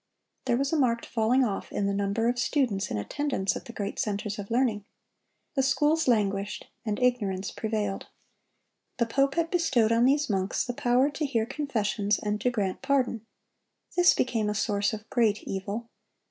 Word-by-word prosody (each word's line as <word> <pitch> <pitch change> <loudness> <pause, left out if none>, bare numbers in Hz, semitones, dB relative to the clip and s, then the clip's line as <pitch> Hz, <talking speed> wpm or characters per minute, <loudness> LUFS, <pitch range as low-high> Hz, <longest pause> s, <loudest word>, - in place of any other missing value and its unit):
There 240 - +2
was 275 +3 -1
a 320 - +2
marked 235 -3 +1
falling 240 +3 +2
off 205 -5 -3
in 200 - -1
the 200 - 0
number 200 +3 0
of 245 0 0
students 240 -7 0
in - - -2
attendance 210 - -1
at - - -7
the - - -8
great 205 -3 -4
centers 210 0 -2
of 200 - -6
learning. 230 -4 +1 0.7
The 270 - +2
schools 295 +4 +2
languished, 205 -3 0 0.2
and 210 -3 -2
ignorance 205 -7 0
prevailed. 215 -3 -3 0.9
The 235 - +2
pope 275 +4 +1
had 335 -1 0
bestowed 270 -11 +2
on 230 +1 +4
these 285 +2 +3
monks 190 -2 0
the 245 - -3
power 255 +1 +2
to 300 +2 -2
hear 230 -5 0
confessions 220 -7 -1
and 210 0 -2
to 250 - +2
grant 200 -6 -2
pardon. 255 -5 0 0.7
This 355 0 +6
became 225 -4 0
a 210 - -2
source 205 -1 +1
of 215 0 -7
great 220 -4 +2
evil. 200 +4 -4
230 Hz, 175 wpm, -27 LUFS, 205-265 Hz, 0.9 s, This